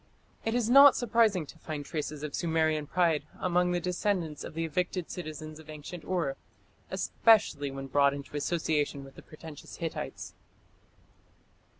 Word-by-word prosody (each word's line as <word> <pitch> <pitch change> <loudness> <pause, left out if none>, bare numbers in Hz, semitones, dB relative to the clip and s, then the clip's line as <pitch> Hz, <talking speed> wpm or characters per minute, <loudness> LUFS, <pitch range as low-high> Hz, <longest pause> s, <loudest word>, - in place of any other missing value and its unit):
It 225 +1 -1
is 240 -3 +1
not 275 +3 +9
surprising 225 -7 +2
to 160 - -14
find 150 -3 -5
traces 150 -2 -4
of 150 -2 -4
Sumerian 160 -2 +1
pride 170 -3 +2 0.2
among 180 -1 +2
the 175 - +1
descendants 180 -3 -1
of - - -8
the 165 0 -1
evicted 180 +2 -2
citizens 155 -2 -7
of 160 0 -14
ancient 155 +2 -8
Ur, 170 -7 -1 0.5
especially 200 -11 +3
when 135 0 -6
brought 140 +1 +3
into 140 +1 -9
association 150 -2 -1
with 135 0 -13
the - - -12
pretentious 155 -1 -11
Hittites. 165 -1 -5
160 Hz, 150 wpm, -29 LUFS, 150-180 Hz, 0.5 s, not